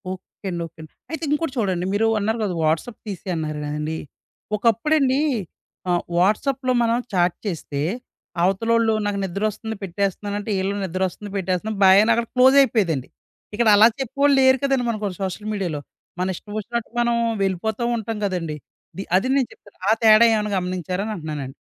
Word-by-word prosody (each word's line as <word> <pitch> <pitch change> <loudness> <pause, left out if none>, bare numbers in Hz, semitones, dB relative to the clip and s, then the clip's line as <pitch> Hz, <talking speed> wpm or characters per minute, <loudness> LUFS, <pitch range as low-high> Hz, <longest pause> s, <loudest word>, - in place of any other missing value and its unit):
Okay. 185 -1 -5 0.3
అండి. 175 -2 -3
Okay. 165 - -26
అండి. 155 - -12 0.2
అయితే 325 0 -4
ఇంకోటి 300 -1 0
చూడండి. 185 -5 0
మీరు 220 +2 +2
అన్నారు 220 +3 -1
కదా! 195 -4 -1
వాట్సాప్ 160 +9 -1
తీసి 195 -2 -7
అన్నారు 155 -2 -3
కదండీ! 150 +2 -3 0.6
ఒకప్పుడండి 260 +5 +2 0.7
ఆహ్, 175 - +1
వాట్సాప్‌లో 255 +8 +1
మనం 230 0 +2 0.2
చాట్ 175 -1 +2
చేస్తే, 160 -7 -4 0.6
అవతలోళ్ళు 225 +5 +2
నాకు 205 -1 -1
నిద్రొస్తుంది 215 +4 -3
పెట్టేస్తున్నానంటే, 200 +3 -3
ఈళ్ళు 195 +1 -1
నిద్రొస్తుంది 190 +3 -3
పెట్టేస్తున్నాను 190 +3 -2
బాయ్ 190 +1 +8
అని 225 - +3
అక్కడకి 230 0 -2
క్లోజ్ 260 +2 +6
అయిపోయేదండి. 180 - +1 0.5
ఇక్కడలా 215 -1 +6
చెప్పేవాళ్ళు 280 +3 +2
లేరు 260 0 +5
కదండీ! 270 -3 +1
మనకు 215 -3 -2
సోషల్ 195 +2 -4
మీడియాలో. 175 -8 -3 0.4
మన 185 +1 0
ఇష్టం 205 +4 -10
ఒచ్చినట్టు 235 +2 -4
మనం 235 0 +2 0.3
వెళ్ళిపోతూ 200 +5 -1
ఉంటాం 220 -1 -4
కదండీ! 170 -6 -3 0.4
ది 195 - -3
అది 195 - 0
నేను 270 -3 +2
చెప్తున్నా. 200 - -22
ఆ - - +7
తేడా 220 +1 +8
ఏమైనా 210 -1 0
గమనించారా? 180 +1 -2
అనంటన్నానండి. 155 -9 -5
205 Hz, 150 wpm, -22 LUFS, 180-230 Hz, 0.7 s, బాయ్